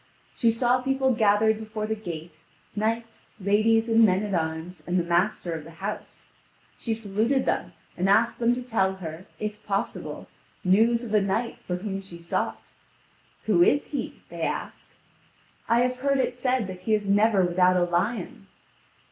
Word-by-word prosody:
She 230 - +3
saw 245 +2 +2
people 265 0 +1
gathered 220 -1 +3
before 215 -1 -4
the 220 - -1
gate, 170 -6 -7 0.4
knights, 225 +2 -3
ladies 215 +3 +3
and 225 0 +5
men 195 -1 +4
at 205 -2 -3
arms, 160 +1 -3
and 180 +1 +1
the 175 - +2
master 175 +1 0
of 160 -2 -5
the 160 - -12
house; 200 +4 -6 0.5
she 225 -2 -2
saluted 225 +5 0
them, - - -1 0.2
and 185 +2 0
asked 230 +4 +3
them 240 +1 +3
to 250 - -5
tell 190 -6 +1
her, 170 -1 -8
if 210 0 -5
possible, 195 -1 -3 0.4
news 225 +6 +3
of 225 -3 -5
a 210 - +5
knight 220 +5 -1
for 180 - -4
whom 195 +1 -4
she 190 -3 -11
sought. 170 0 -3 0.7
"Who 195 -6 +3
is 285 +11 +3
he?" 285 - -5
they - - -8
ask. - - -4 0.7
"I 230 +1 +4
have 250 0 0
heard 275 +2 +1
it 260 - 0
said 250 -2 0
that 185 -1 -8
he 215 +3 +2
is 205 -1 -3
never 205 -1 +4
without 180 +1 +3
a 180 - +3
lion." 180 +3 -2
210 Hz, 175 wpm, -26 LUFS, 185-230 Hz, 0.7 s, and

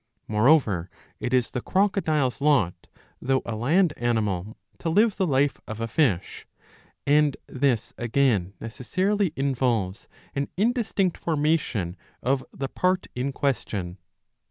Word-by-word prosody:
^'' - - -51 0.2
Moreover 105 - +3 0.3
it 125 - -3
is 125 -2 +2
the 125 - -3
crocodile's 160 - +1
lot 140 - +2 0.3
though 130 +1 +1
a 115 - -3
land 155 - +2
animal 110 -4 -1 0.2
to 165 - -2
live 210 +5 +3
the 190 -2 +1
life 140 -1 +1
of 110 0 -6
a 115 - -2
fish, 115 - 0 0.6
and 145 0 +3
this 130 -4 0
again 115 -6 +1
necessarily 185 - -1
involves 120 -8 0 0.3
an 140 0 -1
indistinct 215 -4 +1
formation 150 - 0 0.3
of 130 +1 +1
the 135 - -4
part 185 +6 0
in 130 +3 -2
question. 100 -10 -2
135 Hz, 130 wpm, -25 LUFS, 110-160 Hz, 0.6 s, Moreover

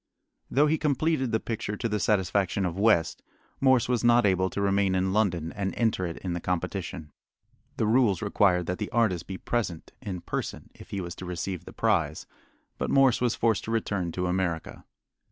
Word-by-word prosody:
Though 145 +3 +4
he 155 +1 +1
completed 145 -3 +1
the 110 - +2
picture 110 -2 -4
to 120 - -1
the 105 -1 -1
satisfaction 95 -2 +1
of 85 -2 -2
West, 100 -7 +3 0.4
Morse 130 -3 +4
was 125 -2 0
not 120 -1 +5
able 95 -1 +2
to - - -5
remain 100 -1 +2
in 95 +1 +1
London 90 -6 +1
and 100 -2 -3
enter 110 -6 +1
it 85 - -6
in 90 -2 -4
the 85 - -2
competition. 90 -2 -3 0.7
The - - +1
rules 110 -4 +3
required 95 -3 +2
that 90 +2 -3
the 105 - -3
artist 105 -8 +1
be 95 - -5
present 100 -10 -3
in 95 -4 -5
person - - -5
if - - -14
he 100 - -3
was 85 -1 -5
to 95 - -7
receive 90 0 -4
the - - -9
prize, 85 -9 0 0.5
but - - -1
Morse 135 -4 +4
was 120 -2 +1
forced 115 -3 +1
to - - -6
return 100 -6 -1
to 90 - -2
America. 90 -2 -2
100 Hz, 190 wpm, -27 LUFS, 90-115 Hz, 0.7 s, not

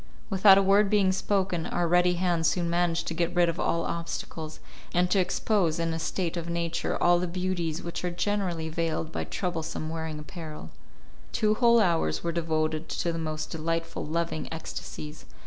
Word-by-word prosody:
Without 195 0 +7
a 195 - +4
word 200 +1 +4
being 200 -2 +4
spoken, 190 -3 0
our 175 -1 0
ready 180 +1 +4
hands 170 -2 +1
soon 170 -2 0
managed 170 -1 +1
to - - -3
get 170 +2 -1
rid 175 -1 +4
of 165 - -3
all 170 0 +1
obstacles, 165 -2 -5 0.4
and 180 0 +3
to 195 - +4
expose 180 -2 +1
in 165 -1 -1
a 160 - -2
state 175 +1 -2
of 170 -1 -4
nature 170 0 -1
all 175 0 +5
the 180 - -1
beauties 175 -2 -2
which 170 +1 -5
are 180 - 0
generally 175 -3 -1
veiled 160 0 -2
by - - -2
troublesome 160 -3 -3
wearing 160 -1 -4
apparel. 155 - -8 0.6
Two 215 0 +2
whole 235 +1 +5
hours 165 - +1
were 170 - 0
devoted 160 -1 -1
to 170 - -1
the 165 - -3
most 155 -1 -4
delightful, 165 +1 -2
loving 165 -1 -2
ecstasies. 155 -1 -7
170 Hz, 180 wpm, -28 LUFS, 160-180 Hz, 0.6 s, Without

